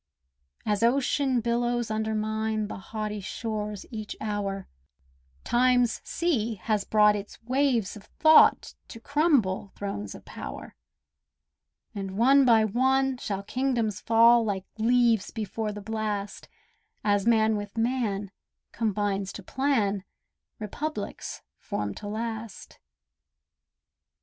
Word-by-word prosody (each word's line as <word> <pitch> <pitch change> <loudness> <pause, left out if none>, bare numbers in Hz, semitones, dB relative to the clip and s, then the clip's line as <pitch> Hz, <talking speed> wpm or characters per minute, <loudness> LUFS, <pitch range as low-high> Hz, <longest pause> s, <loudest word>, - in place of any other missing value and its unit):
As 210 -1 0
ocean 260 +1 +2
billows 240 0 0
undermine 215 0 -1
The - - -6
haughty 210 +1 -4
shores 210 0 -4
each 215 -2 -6
hour, 200 -2 -3 0.8
Time's 245 -1 +2
sea 240 -10 -1
has 215 -3 +1
brought 210 0 +4
its 205 0 -7
waves 250 -4 +1
of 210 -1 -12
thought 315 +6 +5
To 230 - -10
crumble 260 - +1
thrones 105 - -5
of - - -13
power; - - -8 1.2
And 195 -1 -5
one 270 +4 +5
by 225 -3 +5
one 265 +4 +2
shall 200 -4 -4
kingdoms 235 -3 -1
fall 230 +1 +5
Like 200 -3 -2
leaves 235 -2 +3
before 220 0 -3
the 210 0 -7
blast, 210 -1 -4 0.5
As 205 0 +1
man 220 -1 +4
with 205 +1 -6
man 225 -5 -1 0.4
combines 205 -3 -1
to 205 - -8
plan 220 -7 0 0.5
Republics 215 +3 -5 0.2
formed 105 -1 -4
to 205 - -7
last. 220 0 -6
220 Hz, 110 wpm, -27 LUFS, 205-240 Hz, 1.2 s, thought